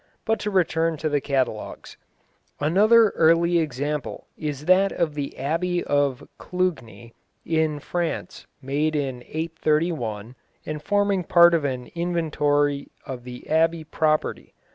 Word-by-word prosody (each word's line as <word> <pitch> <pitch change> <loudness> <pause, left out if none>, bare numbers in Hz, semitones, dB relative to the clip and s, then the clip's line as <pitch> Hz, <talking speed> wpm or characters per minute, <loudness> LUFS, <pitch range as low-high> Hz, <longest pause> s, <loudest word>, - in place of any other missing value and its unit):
But 225 -1 +1
to 210 - -2
return 165 -4 +1
to 155 +1 -2
the 145 -1 0
catalogues. 130 -6 -3 0.6
Another 210 +9 +5
early 170 +1 +3
example 150 -1 -3
is 150 -2 -5
that 190 +3 +4
of 165 -3 -1
the 145 -2 -5
Abbey 175 +5 -1
of 145 -3 0
Clugni, 150 -11 -3 0.3
in 160 -2 0
France, 175 +3 -4 0.2
made 150 +4 0
in 135 -4 -2
831, 155 -8 -2 0.3
and 155 -1 -5
forming 200 -1 +1
part 170 +1 +6
of 160 -4 +1
an 130 -2 -3
inventory 150 -4 0 0.2
of 125 -2 -7
the 125 0 -9
Abbey 165 +1 +2
property. 155 0 -1
155 Hz, 125 wpm, -24 LUFS, 140-170 Hz, 0.6 s, part